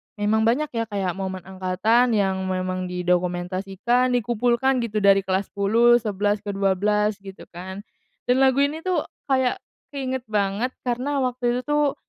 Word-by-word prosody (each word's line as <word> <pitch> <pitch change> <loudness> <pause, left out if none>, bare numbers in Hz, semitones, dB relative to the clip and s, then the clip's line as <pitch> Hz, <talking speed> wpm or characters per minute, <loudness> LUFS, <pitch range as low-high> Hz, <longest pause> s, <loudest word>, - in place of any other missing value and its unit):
memang 220 +2 +1
banyak 290 +6 +1
ya 230 -1 -2
kayak 195 -4 -2
momen 190 -1 -5
angkatan 190 +6 +1
yang 190 -2 +1
memang 185 0 -2
didokumentasikan 185 +7 0
dikumpulkan 245 +3 +1
gitu 215 -3 -2
dari 195 0 +6
kelas 190 +1 -1
10, 230 +4 +4
11, 205 -1 -1
ke 205 -1 -5
12 205 +2 +1
gitu 195 -1 -11
kan, 190 +3 -8 0.4
dan 250 +2 +2
lagu 270 +1 +4
ini 300 +3 -1
tuh 360 -2 -1 0.2
kayak 260 -2 +1 0.4
keinget 260 -3 -3
banget 210 +4 -1
karena 260 +3 -1
waktu 245 -1 0
itu 250 - -1
tuh 295 -1 +1
210 Hz, 150 wpm, -23 LUFS, 190-250 Hz, 0.4 s, dari